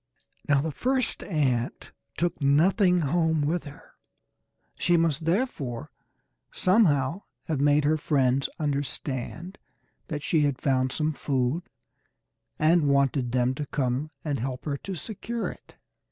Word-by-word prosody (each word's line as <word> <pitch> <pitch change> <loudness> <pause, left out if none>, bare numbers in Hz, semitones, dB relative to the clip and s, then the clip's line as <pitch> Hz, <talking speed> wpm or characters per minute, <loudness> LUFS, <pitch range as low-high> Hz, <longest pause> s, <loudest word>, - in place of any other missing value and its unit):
Now 140 -1 +4
the 160 +2 -2
first 255 - -1
ant 130 - -1 0.3
took 170 -1 -1
nothing 180 +6 +4
home 160 0 +1
with 160 +4 -1
her; 145 0 -12 0.8
she 175 -1 +2
must 165 -1 +1
therefore 165 - -1 0.6
somehow 180 - +2 0.2
have 150 -4 -2
made 145 +1 +4
her 155 +2 +3
friends 135 -3 +1
understand 145 +3 -3 0.5
that 150 -4 -4
she 160 - +2
had 145 -3 +1
found 130 -2 +1
some 155 +3 0
food, 135 +4 -1 0.9
and 155 -1 +3
wanted 140 -3 +2
them 125 0 +2
to 145 +2 -5
come 135 +2 -1 0.2
and 145 -4 -1
help 125 +1 -4
her 145 -2 -1
to 190 +6 -6
secure 225 +6 -4
it. - - -13
150 Hz, 130 wpm, -27 LUFS, 135-170 Hz, 0.9 s, Now